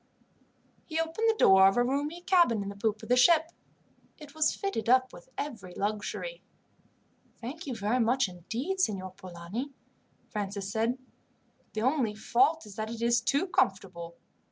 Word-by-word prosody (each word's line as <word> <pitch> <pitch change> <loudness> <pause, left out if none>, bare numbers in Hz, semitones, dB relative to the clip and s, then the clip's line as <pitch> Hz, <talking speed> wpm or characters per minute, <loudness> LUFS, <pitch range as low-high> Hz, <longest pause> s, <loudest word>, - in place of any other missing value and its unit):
He 320 -1 -2
opened 325 +8 0
the 445 - +3
door 190 - +7
of 195 - +2
a 245 - +4
roomy 290 +7 -2
cabin 345 - +3
in 200 - -5
the 200 - -7
poop 215 +1 -1
of - - -9
the 250 - +5
ship. 320 +5 +5 0.7
It 295 -2 -12
was 310 0 +2
fitted 395 - -3
up 255 +1 +4
with 175 - -13
every 205 -11 -6
luxury. 215 - -3 1.0
"Thank 285 +7 -7
you 255 - -3
very 220 +4 0
much 245 +1 +2
indeed, 225 - -4
Signor 190 - 0
Polani," 185 +9 -7 0.6
Francis 200 -1 -4
said. 225 +3 0 0.8
"The 220 - -2
only 255 -5 +1
fault 260 +8 +2
is 210 -1 -12
that 215 0 -3
it 230 0 -5
is 235 0 +3
too 280 +8 +1
comfortable. 190 - -1
235 Hz, 160 wpm, -29 LUFS, 200-300 Hz, 1.0 s, door